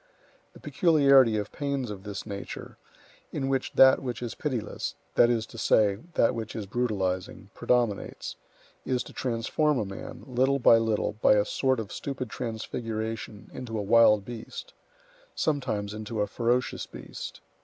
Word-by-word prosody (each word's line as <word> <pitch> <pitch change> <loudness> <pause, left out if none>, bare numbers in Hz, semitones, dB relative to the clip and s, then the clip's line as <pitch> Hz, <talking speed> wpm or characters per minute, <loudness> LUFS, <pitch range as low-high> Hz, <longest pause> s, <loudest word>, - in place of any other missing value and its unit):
The - - -14
peculiarity 140 - +4
of 105 -1 -3
pains 140 -5 -2
of 100 -2 -7
this 100 -1 -6
nature, 100 -2 -7 0.5
in 135 -3 -2
which 135 -1 -1
that 130 0 +7
which 125 -2 -4
is 120 - -4
pitiless—that 120 -2 -1
is 115 -2 +1
to 115 - -11
say, 100 -3 +3 0.2
that 115 - +4
which 115 -2 -5
is 110 -3 -4
brutalizing—predominates, 105 +1 -1 0.5
is 125 -1 -1
to - - -12
transform 130 +5 0
a 110 - 0
man, 95 0 -8
little 130 +1 +2
by 115 -3 +6
little, 110 -2 0
by - - +6
a 105 -1 +3
sort 130 +1 +1
of 110 -2 -6
stupid 130 -4 -5
transfiguration, 110 -2 -5
into 120 -3 -5
a 105 - -2
wild 105 -1 +5
beast; 120 -2 -8 0.6
sometimes 125 -9 -1
into 110 0 -4
a - - +2
ferocious 120 0 -1
beast. - - -8
115 Hz, 145 wpm, -28 LUFS, 105-130 Hz, 0.6 s, that